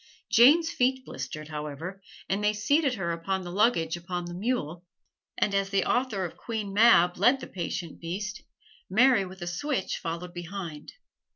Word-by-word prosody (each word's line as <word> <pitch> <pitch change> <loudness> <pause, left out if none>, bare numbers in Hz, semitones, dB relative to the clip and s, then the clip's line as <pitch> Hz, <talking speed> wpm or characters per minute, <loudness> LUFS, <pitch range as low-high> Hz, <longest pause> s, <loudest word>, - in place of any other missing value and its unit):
Jane's 315 +8 +6
feet 260 -1 +1
blistered, 150 +3 -7
however, 155 +5 -6 0.3
and 200 +2 -1
they 210 0 +3
seated 275 +5 +2
her 170 -5 -2
upon 185 +3 -2
the 175 - -7
luggage 185 -5 +2
upon 175 0 -5
the 175 - -7
mule, 180 -5 -2 0.5
and 200 - +1
as 195 0 +1
the 195 -1 +1
author 245 -7 0
of 170 - -7
"Queen 215 -4 -4
Mab" 200 -5 +5
led 245 +8 +4
the - - -7
patient 170 -2 -5
beast, 205 +6 -5 0.5
Mary 225 +1 +4
with 185 0 -9
a - - -5
switch 215 +5 -2
followed 170 +1 -5
behind. 175 -3 -7
190 Hz, 165 wpm, -28 LUFS, 175-230 Hz, 0.5 s, Jane's